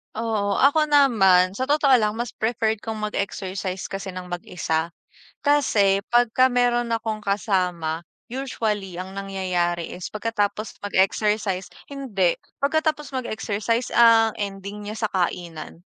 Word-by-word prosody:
Oo, 215 -3 -1
ako 305 +3 +4
naman 195 -11 +5
sa 260 +7 -3
totoo 290 -2 +3
lang 210 0 0
mas 240 0 -3
preferred 220 -1 -1
kong 220 -1 -5
mag-exercise 190 -1 -4
kasi 195 0 -5
ng 180 -1 -7
mag-isa. 170 -2 -2 0.6
Kasi 205 -9 +3
pagka 245 +2 +4
meron 240 -1 +1
akong 220 -1 -2
kasama, 180 -6 -1 0.2
usually 215 -8 -3
ang 190 +1 -6
nangyayari 185 -3 -2
is 180 - -7
pagkatapos 215 -1 -2
mag-exercise 195 -1 0 0.2
hindi, 215 -11 0 0.2
pagkatapos 305 0 0
mag-exercise 230 -1 -2
ang 225 -2 +6
ending 200 +1 -6
niya 220 - -6
sa - - -7
kainan. 170 -2 -3
210 Hz, 120 wpm, -23 LUFS, 190-235 Hz, 0.6 s, ang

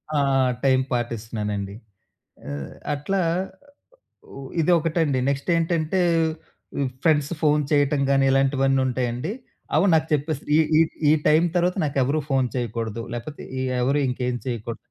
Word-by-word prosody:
ఆ! - - +3 0.4
టైమ్ 130 -1 +3
పాటిస్తున్నానండి. 105 -4 -3 0.7
అ - - -5 0.4
అట్లా 185 +7 -1 1.2
ఉ - - -7 0.2
ఇదొకటండి. 165 -4 +2
నెక్స్ట్ 140 +4 -2
ఏంటంటే 165 +1 0 0.8
ఉ - - +1 0.2
ఫ్రెండ్స్ 150 -3 +2
ఫోన్ 150 -1 +3
చేయటం 145 -1 +2
గాని 135 0 +3
ఇలాంటివన్నీ 135 0 +2
ఉంటాయండి. 125 +4 -2 0.4
అవి 160 +6 +4
నాకు 160 0 +3
చెప్పేసి 150 0 -1 0.2
ఈ, - - +5 0.2
ఈ, - - +7 0.3
ఈ - - +6 0.2
టైమ్ 155 +3 +5
తర్వాత 180 +2 +1
నాకెవరు 140 +1 +1
ఫోన్ 130 -2 +2
చేయకూడదు. 115 -2 -3
లేకపోతే 120 +5 -7 0.4
ఎవరు 140 +4 +2
ఇంకేం 125 -1 -2
చేయకూడదు. 115 -1 -4
135 Hz, 125 wpm, -23 LUFS, 125-155 Hz, 1.2 s, ఈ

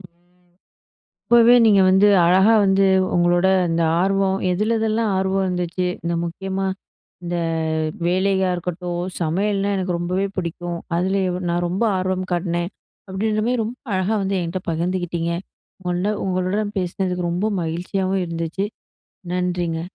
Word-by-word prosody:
இப்பவே 175 0 -23 0.9
நீங்க 200 -3 +5
வந்து, 190 +2 +5 0.2
அழகா 190 +5 +5
வந்து, 195 0 +3 0.3
உங்களோட 175 +1 +3 0.2
இந்த 165 0 +1 0.2
ஆர்வம் 195 0 +1
எதிலெதில்லாம் 220 +2 0
ஆர்வம் 190 0 0
இருந்துச்சு. 180 0 -2 0.2
இந்த 170 0 -1
முக்கியமா, 190 +3 -3 0.6
இந்த 175 0 -2 0.7
வேலையா 190 +1 +2
இருக்கட்டும். 175 0 -4 0.2
"சமையல்ன்னா 195 +5 0
எனக்கு 185 -2 -1
ரொம்பவே 180 +3 -1
பிடிக்கும். 175 0 -4 0.2
அதுலயும் 185 0 0
நான் 175 +1 0
ரொம்ப 190 +6 -2
ஆர்வம் 185 0 -2
காட்டினேன்" 175 +1 -1 0.4
அப்பிடீன்ற 215 +3 -1
மாரி 245 -1 +1
ரொம்ப 230 +3 -5 0.2
அழகா 190 +3 0
வந்து 195 0 -1
என்கிட்ட 175 +2 -3
பகிர்ந்துக்கிட்டீங்க. 170 0 -2 0.5
உங்கள்ட 180 +3 0
உங்களுடன் 190 +3 -1
பேசுனதுக்கு 180 -1 -2
ரொம்ப 180 +5 -1 0.2
மகிழ்ச்சியாவும் 185 +3 -1
இருந்துச்சு. 165 +3 -3 0.7
நன்றிங்க. 175 -2 -1
185 Hz, 115 wpm, -21 LUFS, 175-195 Hz, 0.9 s, நீங்க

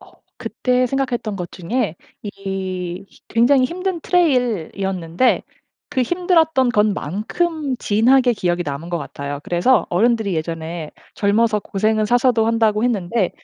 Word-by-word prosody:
어 - - -18 0.3
그때 250 0 0
생각했던 245 -5 -2
것 180 -2 -6
중에 195 -1 -2 0.3
이 190 -2 -5 0.2
굉장히 255 +3 +4
힘든 365 +4 -3
트레일 250 - +1
이었는데 190 +3 0 0.5
그 265 -3 +1
힘들었던 320 -4 +2
것만큼 225 - -1
진하게 245 +4 +3
기억이 175 -4 -1
남은 150 +3 -5
것 170 - -1
같아요. 140 0 -6
그래서 180 +10 +2
어른들이 220 0 +2
예전에 160 0 -4 0.2
젊어서 210 +1 +2
고생은 215 +3 0
사서도 240 -1 +3
한다고 220 -1 +2
했는데 205 -4 0
215 Hz, 305 characters per minute, -20 LUFS, 180-255 Hz, 0.5 s, 굉장히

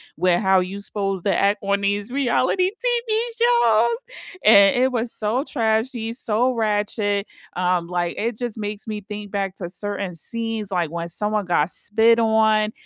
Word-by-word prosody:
with 175 +1 +2
how 190 -2 +4
you's 195 +3 -5
supposed 195 -3 -3
to 200 - +2
act 200 +1 +2
on 200 0 0
these 205 +3 -1
reality 280 +7 +1
TV 480 -2 0 0.3
shows, 235 - +3 0.5
and 200 -2 +7
it 255 +1 +3
was 235 -1 -2
so 225 +5 -1
trashy, 225 -3 -1
so 245 +1 0
ratchet, 210 -2 -1 0.3
um, 180 -1 0
like, 175 -1 -2
it 230 0 -2
just 240 -3 -4
makes 210 0 -5
me 210 -1 -4
think 210 +1 -7
back 195 -2 -2
to 175 -3 -5
certain 200 0 -4
scenes, 225 +3 -3
like, 175 -4 -1
when 170 0 -4
someone 210 +3 -1
got 170 -2 +1
spit 225 +2 +2
on, 220 -1 +3
210 Hz, 165 wpm, -22 LUFS, 195-230 Hz, 0.5 s, and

